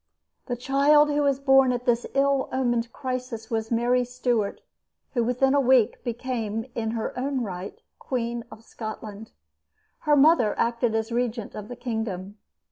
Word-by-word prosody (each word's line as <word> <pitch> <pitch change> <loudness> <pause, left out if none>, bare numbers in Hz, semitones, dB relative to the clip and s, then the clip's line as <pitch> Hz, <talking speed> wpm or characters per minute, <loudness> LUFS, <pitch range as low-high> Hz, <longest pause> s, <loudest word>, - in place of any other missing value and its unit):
The 245 - -1
child 280 +4 +4
who 295 0 +1
was 280 -2 +2
born 270 -2 +5
at 245 0 -3
this 240 0 +1
ill 275 -1 +2
omened 240 -3 0
crisis 255 -4 -5
was 225 -1 -1
Mary 245 +2 +2
Stuart, 245 -4 -1 0.5
who 240 -3 +1
within 250 +3 +2
a 285 - +4
week 255 -4 +3
became, 230 -2 -3
in 225 -1 -2
her 225 - -3
own 260 0 -1
right, 190 -2 -6 0.2
Queen 235 -2 -3
of 220 - -13
Scotland. 220 -1 -8 0.7
Her 300 -1 +3
mother 280 -6 +4
acted 235 -1 +1
as 225 +1 -1
regent 235 -2 -2
of 210 -1 -7
the 245 - -7
kingdom. 215 -5 -4
240 Hz, 155 wpm, -25 LUFS, 225-265 Hz, 0.7 s, born